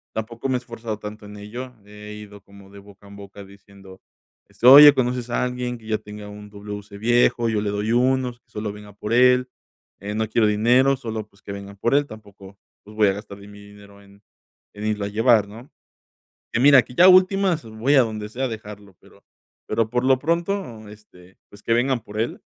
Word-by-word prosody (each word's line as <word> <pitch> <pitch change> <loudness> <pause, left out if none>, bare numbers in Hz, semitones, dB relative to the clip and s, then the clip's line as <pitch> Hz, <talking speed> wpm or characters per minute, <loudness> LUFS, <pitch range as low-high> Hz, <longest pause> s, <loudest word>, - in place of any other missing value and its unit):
tampoco 115 +3 -5
me 130 - +1
he - - +2
esforzado 115 -3 -7
tanto 105 0 -9
en 105 0 -11
ello, 120 +5 -8
he 105 0 -11
ido 105 -1 -12
como 100 -1 -17
de 100 - -13
boca 100 0 -18
en 100 - -13
boca 100 0 -12
diciendo: 100 -1 -17 0.5
"Este, - - -7
oye, 145 +2 +10
¿conoces 125 -2 -2
a 120 - -1
alguien 125 -1 -4
que 115 - -19
ya 110 - 0
tenga 105 0 -11
un 105 0 -11
WC 105 0 -9
viejo? 120 +1 +2
Yo 110 -2 -1
le 105 - -2
doy 105 +2 -2
unos, 125 0 0
que - - -48
solo 105 -1 -5
venga 105 -1 -13
por 105 +2 -5
él, 125 +1 +4 0.5
eh, 105 +2 -6
no 110 0 -1
quiero 110 -1 +2
dinero, 120 +6 +3
solo, 110 -3 -6
pues, 100 -1 -28
que - - -8
vengan 100 0 -10
por 120 +6 -1
él", 145 0 +2
tampoco, 100 -3 -14 0.3
pues, 105 +1 -15
voy 105 -1 +3
a - - 0
gastar 100 0 -10
de 100 - -14
mi 105 0 -14
dinero 100 0 -16
en 100 +1 -21 0.5
en 105 +1 -7
irlo 105 -1 -2
a - - -4
llevar, 110 0 +3
¿no? 115 +6 -13 0.8
Y 115 - 0
mira, 140 0 +7
que 125 - -15
ya 175 - +6
a - - +9
últimas 185 -2 +3
voy 110 +6 -1
a 135 - +6
donde 110 -3 -4
sea 130 +4 -3
dejarlo, 105 -3 -10
pero - - -22 0.4
pero 115 -1 -1
por 125 +2 -1
lo 130 -1 +3
pronto, 170 - -3
este, 95 -3 -18
pues, 105 - -17
que 115 - 0
vengan 125 +2 +1
por 105 0 -8
él, 115 - -4
110 Hz, 215 wpm, -22 LUFS, 105-125 Hz, 0.8 s, oye